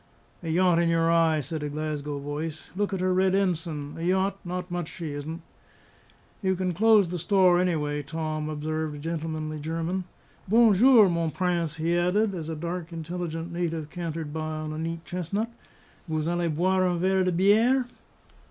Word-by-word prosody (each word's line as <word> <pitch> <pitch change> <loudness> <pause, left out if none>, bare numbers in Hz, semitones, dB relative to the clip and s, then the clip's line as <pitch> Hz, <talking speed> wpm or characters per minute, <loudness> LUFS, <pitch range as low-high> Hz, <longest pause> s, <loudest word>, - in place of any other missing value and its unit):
"A 165 - -5
yacht 175 +1 +3
in 170 -1 +2
your 165 0 +3
eye!" 165 -2 +3
said 155 +3 -5
a 150 - -3
Glasgow 150 -1 -3
voice. 145 +2 -5
"Look 205 +1 0
at 190 -2 -2
her 185 0 +2
red 190 +1 +3
ensign! 165 -6 -1
A - - -5
yacht! 190 +3 +1
not 180 0 -5
much 175 -2 -2
she 165 -4 -6
isn't!" 155 +4 -6 1.0
"You 190 -2 +1
can 185 -1 -1
close 210 0 +5
the 175 0 -3
store, 180 0 +4
anyway, 150 -5 0
Tom," 155 +1 -3
observed 155 0 -3
a - - -8
gentlemanly 155 0 -4
German. 165 +4 -2 0.4
"Bon 225 +2 +6
jour, 225 +1 +7
mon 170 -2 0
Prince!" 170 -2 -1
he 165 +2 0
added, 195 +4 +2
as 165 -3 -5
a 160 - -3
dark, 170 +2 -5
intelligent 165 0 -5
native 165 -3 -3
cantered 165 -3 -4
by 155 0 -3
on 155 0 -4
a 155 - -5
neat 165 +1 -4
chestnut. 195 +6 -3 0.6
"Vous 155 0 -1
allez 175 0 0
boire 185 +4 +2
un 175 -1 0
verre 190 +2 +2
de 185 - +1
biere?" 220 +9 +4
170 Hz, 180 wpm, -27 LUFS, 155-185 Hz, 1.0 s, jour